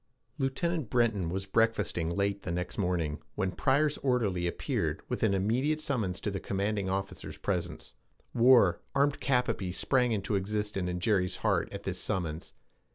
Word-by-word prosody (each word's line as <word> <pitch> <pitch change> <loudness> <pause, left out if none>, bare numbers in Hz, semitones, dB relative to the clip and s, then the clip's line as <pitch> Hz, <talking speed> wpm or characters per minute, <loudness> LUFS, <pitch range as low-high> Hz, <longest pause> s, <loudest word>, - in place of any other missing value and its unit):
Lieutenant 145 +1 -1
Breton 110 -8 +1
was 95 +2 -3
breakfasting 100 -6 +1
late 100 +3 0
the - - -6
next 90 +4 -3
morning, 85 -6 0 0.2
when 95 -3 0
Pryor's 145 +8 +2
orderly 105 -10 +1
appeared 85 - -2
with - - -2
an 100 -3 +3
immediate 125 +11 +1
summons 110 -12 -1
to 105 - -2
the 95 - -3
commanding 100 0 -1
officer's 95 +1 -4
presence. - - -3 0.4
War, 115 -8 +5
armed 140 +1 +2
cap 125 -2 +2
à - - 0
pie, 95 -3 -4
sprang 125 +6 +1
into 105 -1 -1
existence 100 -1 -1
in 90 0 -2
Jerry's 90 -1 +1
heart - - +2
at - - -7
this - - -3
summons. 80 -4 -3
100 Hz, 160 wpm, -30 LUFS, 90-125 Hz, 0.4 s, War